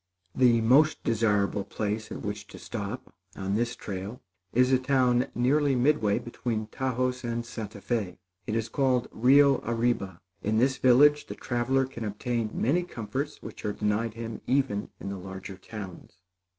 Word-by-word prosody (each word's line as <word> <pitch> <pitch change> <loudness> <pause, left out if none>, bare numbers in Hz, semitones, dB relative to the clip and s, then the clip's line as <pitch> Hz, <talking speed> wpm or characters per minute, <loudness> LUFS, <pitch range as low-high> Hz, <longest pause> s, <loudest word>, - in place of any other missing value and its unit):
The 120 -3 +4
most 140 +7 +4
desirable 105 -3 +1
place 105 +1 -3
at - - -6
which 105 0 -5
to - - -11
stop, 110 +2 -6 0.2
on 95 0 -3
this 115 +3 0
trail, 100 +4 -6 0.3
is 125 +2 +3
a 130 - +4
town 130 -2 +2
nearly 135 +3 +3
midway 125 -5 +2
between 115 -2 -3
Taos 130 +2 -2
and 120 0 -2
Santa 110 -3 -7
Fé. 105 -7 -2 0.3
It 110 - -1
is 115 0 0
called 125 0 +1
Rio 135 +3 +5
Arriba. 115 -6 -1 0.2
In 110 +1 0
this 130 +3 +3
village, 145 +4 +5
the - - -6
traveler 130 +2 0
can 130 -3 -7
obtain 110 +2 -2
many 155 +9 +1
comforts 135 -1 -5
which - - -9
are 105 - -1
denied 105 +2 -1
him 115 -1 -6
even 130 -6 +1
in - - -5
the 100 -1 -5
larger 95 +1 -8
towns. 100 -3 -9
115 Hz, 160 wpm, -28 LUFS, 105-130 Hz, 0.3 s, Rio